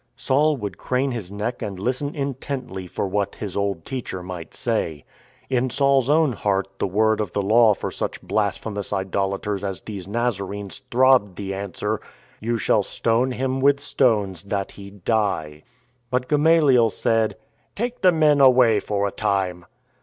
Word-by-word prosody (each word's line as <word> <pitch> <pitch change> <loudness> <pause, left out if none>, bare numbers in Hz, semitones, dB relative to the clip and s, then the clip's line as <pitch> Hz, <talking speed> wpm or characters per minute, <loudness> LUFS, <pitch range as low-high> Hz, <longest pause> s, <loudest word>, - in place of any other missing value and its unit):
Saul 145 +3 +2
would 105 -5 -6
crane 130 +2 0
his 110 -7 -5
neck 105 +4 -3
and 100 -2 -4
listen 130 +8 -2
intently 130 -8 -4
for 90 - -3
what 100 +1 -1
his 100 -4 -6
old 100 -5 -1
teacher 120 -8 -5
might 90 -3 -8
say. 110 - -2 0.4
In 130 0 +1
Saul's 140 0 +2
own 155 -1 +4
heart 100 -2 0
the - - +1
word 110 +3 +2
of 105 -4 -4
the 100 - 0
Law 110 +1 +5
for - - -4
such - - -4
blasphemous 105 -1 -2
idolators 100 +1 -2
as 95 -4 -3
these 100 -4 -7
Nazarenes 100 -3 -3
throbbed 125 -6 +4
the 95 0 -4
answer: 100 +2 -3 0.2
" - - -29
You 115 +2 -1
shall 110 - +2
stone 120 +3 0
him 130 +1 -1
with 140 +1 +4
stones 105 - +1
that 100 -1 -2
he 100 -1 -11
die." 100 -7 -1 0.5
But 125 0 -1
Gamaliel 150 -6 +4
said, 110 +1 0 0.2
" - - -42
Take 240 +3 -3
the 185 - +6
men 155 -3 +4
away 125 -5 +6
for 100 0 -1
a - - -4
time." 95 -4 -1
110 Hz, 165 wpm, -23 LUFS, 100-130 Hz, 0.5 s, the